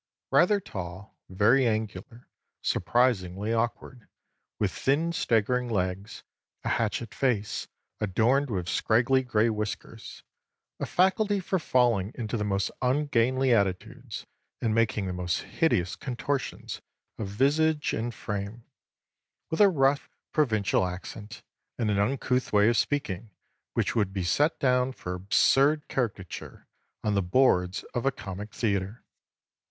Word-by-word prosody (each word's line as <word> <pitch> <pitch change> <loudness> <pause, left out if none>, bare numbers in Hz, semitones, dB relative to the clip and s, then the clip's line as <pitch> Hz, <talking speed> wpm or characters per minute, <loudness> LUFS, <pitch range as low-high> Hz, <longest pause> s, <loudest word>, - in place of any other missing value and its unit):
Rather 210 -1 +5
tall, 95 - -8
very 115 +8 +4
angular, 110 +1 -4 0.4
surprisingly 105 -4 +1
awkward, 120 +1 -3 0.5
with - - 0
thin 160 +5 0
staggering 125 -2 +1
legs, 95 -1 -2 0.4
a - - -2
hatchet 115 0 -1
face 115 -6 -1 0.3
adorned 120 +8 +2
with 90 -5 -2
scraggy 120 +7 +2
gray 115 -3 +2
whiskers, 105 -1 -5 0.6
a - - -2
faculty 200 +3 +2
for 190 0 -1
falling 120 - +2
into 115 -2 -3
the 105 - -1
most 100 -1 0
ungainly 130 -1 +2
attitudes, 110 +4 -2 0.3
and 110 -2 0
making 110 -3 +1
the 90 - -3
most 90 -2 -1
hideous 90 - 0
contortions 135 +1 -4 0.4
of 110 - -3
visage 150 +8 +2
and 115 +1 -3
frame; 105 +3 -5 0.9
with 160 - +1
a 205 - +8
rough 140 -4 +2 0.2
provincial 110 -11 +2
accent 100 +5 -6 0.3
and 110 -3 0
an 100 - +1
uncouth 125 +3 0
way 105 0 +5
of 120 - +2
speaking 115 -6 -1 0.4
which - - 0
would 105 -4 +1
be 95 -2 -2
set 145 - +2
down 125 -1 +2
for 90 -8 -6
absurd 135 +10 +3
caricature 105 -8 -4 0.4
on 105 - +1
the 100 - +2
boards 90 -2 +2
of 120 - -1
a - - +4
comic 100 -2 -7
theatre. 100 0 -2
115 Hz, 125 wpm, -27 LUFS, 100-130 Hz, 0.9 s, a